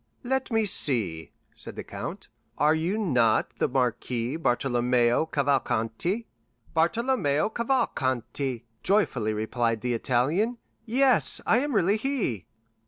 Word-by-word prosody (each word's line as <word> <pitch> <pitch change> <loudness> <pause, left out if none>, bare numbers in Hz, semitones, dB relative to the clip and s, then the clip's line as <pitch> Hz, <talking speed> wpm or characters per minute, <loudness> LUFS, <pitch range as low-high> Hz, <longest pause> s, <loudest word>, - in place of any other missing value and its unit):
"Let 265 +1 -1
me 225 -2 +1
see," 100 - +1 0.2
said - - -8
the - - -6
count; - - -7 0.3
"are 150 +1 +4
you 165 +6 -1
not 125 - +1
the - - +1
Marquis 125 -1 -1
Bartolomeo 120 -1 +1
Cavalcanti?" 140 - -1 0.5
"Bartolomeo 170 - +1
Cavalcanti," 130 - -1 0.2
joyfully 135 - +1
replied 115 +1 -1
the 125 -1 -1
Italian; 145 - 0 0.3
"yes, 260 +3 +3
I 230 - +4
am 285 -1 -2
really 200 +2 +3
he." 220 - -2
140 Hz, 110 wpm, -26 LUFS, -, 0.5 s, are